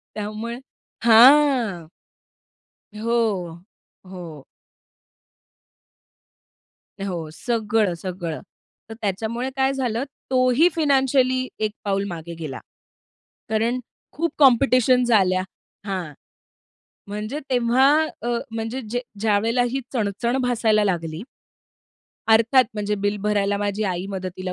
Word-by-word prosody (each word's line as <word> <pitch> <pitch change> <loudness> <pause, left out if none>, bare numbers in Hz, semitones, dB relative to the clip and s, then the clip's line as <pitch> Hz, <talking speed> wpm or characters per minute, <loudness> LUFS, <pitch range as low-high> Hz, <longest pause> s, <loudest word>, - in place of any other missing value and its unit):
त्यामुळे 215 +3 -5 0.5
हां. 235 - +5 1.1
हो, 215 -6 -1 0.5
हो. 170 -6 -9 2.6
हो, 175 -5 -4
सगळं, 215 -1 0
सगळं. 175 -4 -5 0.5
तर 225 - -7
त्याच्यामुळे 225 +5 -2
काय 265 0 +2
झालं, 250 -2 -2 0.3
तो 255 -1 +3
ही 330 +6 +6
फायनान्शियली 265 -4 +2
एक 215 -1 -1
पाऊल 195 -1 0
मागे 170 -1 -7
गेला. 145 -5 -5 0.9
कारण 225 +3 0 0.3
खूप 335 +3 -2
कॉम्पिटिशन 255 -2 +5
झाल्या 190 -6 +3 0.4
हां, 185 -6 -4 1.0
म्हणजे 210 +7 -4
तेव्हा 250 +1 +3 0.3
अ, 235 - -4 0.2
म्हणजे 225 +3 -4
जे 225 - -11
ज्या 245 +2 -2 0.2
ज्यावेळेला 225 +3 +2
ही 265 +3 -2
चणचण 235 +2 -1
भासायला 225 -4 +2
लागली. 165 -4 -2 1.1
अर्थात 230 +4 +5
म्हणजे, 210 0 -1
बिल 205 0 -1
भरायला 205 -1 +1
माझी 205 +1 -2
आई 185 -1 -2
मदतीला 185 -1 -5
220 Hz, 100 wpm, -22 LUFS, 195-245 Hz, 2.6 s, ही